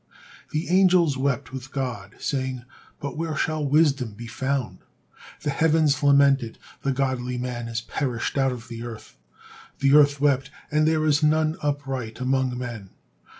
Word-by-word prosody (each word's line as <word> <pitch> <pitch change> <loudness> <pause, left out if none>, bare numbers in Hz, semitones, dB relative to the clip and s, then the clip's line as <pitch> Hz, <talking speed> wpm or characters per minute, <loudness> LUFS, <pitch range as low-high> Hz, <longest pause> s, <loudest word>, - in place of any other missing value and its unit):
The 155 +2 -2
angels 180 -5 +4
wept 135 0 -1
with 130 0 -7
God, 130 -3 -4
saying, 130 -3 -3 0.4
"But 140 +1 -5
where 160 -1 -2
shall 155 +1 -1
wisdom 140 -5 +2
be 120 +2 -8
found?" 130 +2 -2 0.6
The 145 - 0
heavens 155 -1 +2
lamented: 140 -4 +4 0.2
"The 140 - 0
godly 130 -2 -1
man 120 -1 -4
is 115 0 -3
perished 125 -2 -3
out 135 -1 +2
of 120 -2 -7
the 115 -1 -7
earth." 115 - -9 0.6
The 135 0 +3
earth 145 -1 +6
wept: 140 -2 +2 0.2
"And 155 +1 +3
there 155 -1 +2
is 150 0 +3
none 155 +1 +2
upright 135 -6 -3
among 130 -1 0
men." 115 -6 -6
135 Hz, 150 wpm, -24 LUFS, 125-150 Hz, 0.6 s, earth